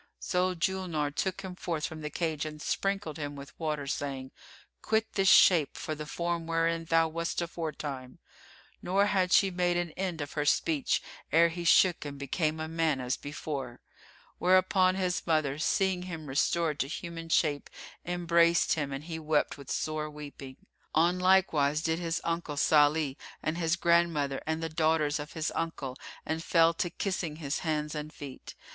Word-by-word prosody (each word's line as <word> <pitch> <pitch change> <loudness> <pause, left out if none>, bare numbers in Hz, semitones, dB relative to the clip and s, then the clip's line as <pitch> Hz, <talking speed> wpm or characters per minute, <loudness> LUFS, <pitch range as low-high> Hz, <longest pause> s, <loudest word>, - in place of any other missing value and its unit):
So 180 0 0
Julnar 170 -4 -1
took 190 +3 -1
him 190 -1 -6
forth 165 -4 -3
of 160 0 -7
the 150 - -4
cage 160 -1 -2
and 155 -1 -6
sprinkled 195 -2 -2
him 145 -2 -5
with 140 +1 -10
water, 150 -3 -2
saying, 135 -1 -4 0.5
"Quit 220 0 0
this 195 -1 +1
shape 165 -6 +6
for 155 - -4
the 150 0 -6
form 170 +1 -2
wherein 165 0 0
thou 165 0 +3
wast 170 +1 -3
aforetime;" 150 -6 -5 0.6
nor 195 +3 +2
had 190 -3 +1
she 195 0 +5
made 175 -1 +1
an 175 -2 -2
end 180 -1 -3
of 145 -1 -5
her 150 - 0
speech 150 0 +1 0.3
ere 170 +1 +5
he 175 +1 -5
shook 175 +1 +5
and 145 -1 -6
became 155 +3 -1
a 160 - -3
man 160 -3 0
as 125 0 -1
before: 140 -4 -6 0.6
whereupon 185 0 +4
his 180 -2 -1
mother, 155 -3 +1
seeing 190 +2 +1
him 165 -4 -6
restored 150 +2 0
to 135 - 0
human 165 +2 -6
shape, 150 -3 +1 0.3
embraced 170 -1 +3
him 145 -3 -2
and 135 +1 -5
he 160 0 -5
wept 155 -1 +1
with 140 -2 -12
sore 155 0 -2
weeping. 145 -3 -9 0.4
On 170 +3 +3
like 190 0 +4
wise 150 +1 +1
did 165 0 0
his 170 -1 -1
uncle 165 -3 -2
Salih 150 -1 +3 0.3
and 155 - -1
his 165 0 +2
grandmother 170 -5 +2
and 160 +1 -1
the - - 0
daughters 155 -2 +1
of 145 +1 -7
his 160 -1 -2
uncle 150 -6 -3 0.3
and 160 +1 -2
fell 165 -1 +4
to 175 +1 -1
kissing 180 -5 -3
his 150 -2 -3
hands 150 -2 -2
and 150 0 -5
feet. 140 -3 -10
160 Hz, 175 wpm, -30 LUFS, 150-175 Hz, 0.6 s, shape